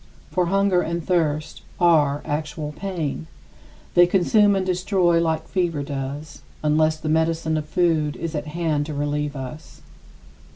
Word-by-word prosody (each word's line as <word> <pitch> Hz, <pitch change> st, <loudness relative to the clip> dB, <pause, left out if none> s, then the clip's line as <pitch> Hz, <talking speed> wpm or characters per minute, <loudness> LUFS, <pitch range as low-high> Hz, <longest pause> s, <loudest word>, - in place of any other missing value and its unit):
For 180 Hz, -2 st, +1 dB
hunger 195 Hz, -1 st, +2 dB
and 170 Hz, -1 st, -3 dB
thirst 155 Hz, -4 st, 0 dB, 0.2 s
are 150 Hz, -5 st, +3 dB
actual 150 Hz, 0 st, -3 dB
pain. 155 Hz, -, -4 dB, 0.7 s
They 175 Hz, 0 st, +6 dB
consume 200 Hz, +3 st, +4 dB
and 190 Hz, -1 st, 0 dB
destroy 180 Hz, -2 st, +2 dB
like 160 Hz, -1 st, -1 dB
fever 170 Hz, -6 st, -1 dB
does, 140 Hz, +2 st, -6 dB, 0.2 s
unless 155 Hz, +1 st, +2 dB
the 155 Hz, -, -6 dB
medicine 160 Hz, 0 st, +1 dB
of 155 Hz, -1 st, -3 dB
food 160 Hz, -5 st, +1 dB
is 165 Hz, 0 st, -5 dB
at 150 Hz, -1 st, -3 dB
hand 155 Hz, -2 st, -1 dB
to 155 Hz, -, -5 dB
relieve 145 Hz, 0 st, -2 dB
us. 135 Hz, +3 st, -9 dB
160 Hz, 140 wpm, -23 LUFS, 150-175 Hz, 0.7 s, They